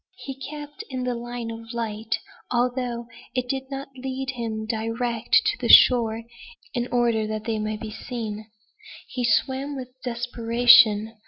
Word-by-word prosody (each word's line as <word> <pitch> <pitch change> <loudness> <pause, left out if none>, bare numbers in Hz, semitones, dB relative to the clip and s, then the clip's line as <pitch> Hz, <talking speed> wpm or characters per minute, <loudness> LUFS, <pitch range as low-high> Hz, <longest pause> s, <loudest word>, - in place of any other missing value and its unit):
He 270 - -6
kept 295 +7 -8
in 255 -1 -3
the 250 0 -1
line 240 -1 -5
of 225 +1 -9
light, 225 -1 -2 0.3
although 245 -1 -1 0.3
it 250 -1 -1
did 265 +1 -3
not 275 0 -6
lead 265 0 -4
him 225 -3 -4
direct 230 +1 +1
to - - +1
the - - -2
shore, 230 -2 +7 0.5
in 240 0 -1
order 235 -3 +2
that 215 0 -4
they 220 -1 -2
might 215 0 -3
be 220 - -5
seen. 215 -2 -6 0.6
He 250 - -4
swam 265 +4 +1
with 255 -2 -6
desperation. 235 -2 +4
240 Hz, 150 wpm, -24 LUFS, 225-255 Hz, 0.6 s, shore